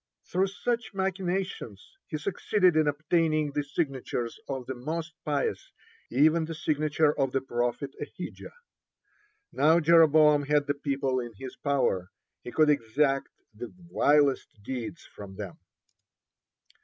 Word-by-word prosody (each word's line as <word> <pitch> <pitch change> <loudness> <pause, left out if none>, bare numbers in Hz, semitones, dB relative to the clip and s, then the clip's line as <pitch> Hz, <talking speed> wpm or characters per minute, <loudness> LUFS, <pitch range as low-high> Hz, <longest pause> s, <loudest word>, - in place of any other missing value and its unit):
Through 190 +2 +2
such 235 +2 -3
machinations 185 - -3 0.2
he 155 - -3
succeeded 185 +2 +1
in 155 -1 +3
obtaining 155 0 +1
the 145 +1 -1
signatures 135 -5 -3
of 135 -2 -3
the 130 - -4
most 160 +6 -4
pious, 145 -2 -2 0.4
even 155 +5 +3
the 165 0 -6
signature 155 0 +1
of 135 -2 +1
the 135 - +2
prophet 120 +2 -2
Ahijah. - - -8 1.0
Now 160 +4 +4
Jeroboam 155 -3 +5
had 150 -1 +3
the 145 - 0
people 135 -2 -1
is 120 -2 -6
his 130 +3 -8
power. 135 -11 0 0.4
He 120 - -7
could 155 +4 +4
exact 135 +2 +1 0.2
the 115 +3 -8 0.2
vilest 140 -7 +2
deeds 130 +7 -5
from 100 -2 -11
them. 100 -3 -7
145 Hz, 130 wpm, -28 LUFS, 130-160 Hz, 1.0 s, Jeroboam